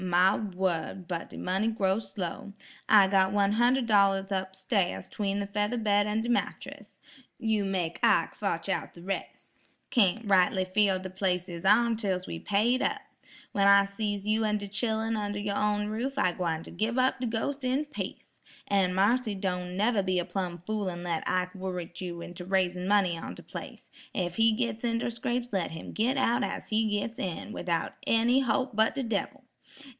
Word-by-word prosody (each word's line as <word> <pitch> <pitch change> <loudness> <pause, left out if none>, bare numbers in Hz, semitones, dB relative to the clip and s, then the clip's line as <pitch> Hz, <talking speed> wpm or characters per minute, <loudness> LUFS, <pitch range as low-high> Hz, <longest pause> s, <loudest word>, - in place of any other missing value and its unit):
"My 185 +2 +4
wurd, 185 -3 -2
but 170 -2 -4
de - - -10
money 190 +4 0
grow 200 -3 +1
slow; 200 -1 -6 0.4
I 205 -3 +7
got 190 -1 +3
one 200 0 +2
hunder' 245 +3 +3
dollars 200 -3 +3
up 190 0 -2
stairs 190 -1 -1
'tween 200 -1 -2
the 200 - -1
feather 210 +4 -1
bed 205 -2 +2
an' 215 +1 0
de 230 - -4
mattress. 240 - -3 0.4
You 220 -2 0
make 180 -4 -2
Ike - - +3
fotch - - -2
out - - -2
de 170 - -12
res'. 195 +1 -6 0.2
Cayn't 220 0 +2
rightly 185 -1 +3
feel 195 0 +3
de 185 0 -7
place 185 -1 -1
is 170 0 -7
ourn 225 +3 +4
till 195 -5 0
we's 165 - -6
paid 225 +5 +2
up. - - 0 0.5
When 200 -1 +3
I 200 0 +7
sees 205 0 -3
you 220 +1 +2
an' 210 -1 +1
de 205 -1 -6
chillun 220 +2 -1
under 205 -1 -2
your 205 0 -2
own 210 0 +1
roof, 250 +6 -3
I 225 -9 +3
gwine 165 -2 -2
ter - - -10
gib 220 +7 -1
up 255 +1 +2
de 250 - -1
ghos' 265 +5 -2
in 260 +4 +1
peace. 295 - -7 0.3
An' 190 -2 +2
Marthy, 215 +3 +2
don't 180 -1 -3
neber 215 +1 +2
be 185 -1 0
a 175 - 0
plum 175 -2 -4
fool 210 -2 -1
an 175 -1 -6
let 170 -2 -2
Ike 180 0 0
wurrit 180 -2 -5
you 175 -2 -5
into 175 +1 -8
raisin' 180 -1 0
money 190 -5 +3
on - - -7
de - - -12
place, - - -9 0.2
ef 175 -2 -2
he 225 0 +5
gits 230 0 -2
inter 235 0 0
scrapes 240 +1 -2
let 190 -4 0
him 160 - -7
git 245 +5 0
out 255 -1 +2
as - - -4
he 220 0 +2
gits 225 +3 -5
in, 185 +3 -4
widout 170 -2 -2
any 235 +3 +4
holp 260 +1 0
but 220 +3 +3
de 275 - -1
debbil. 230 +4 -3
200 Hz, 195 wpm, -29 LUFS, 185-225 Hz, 0.5 s, I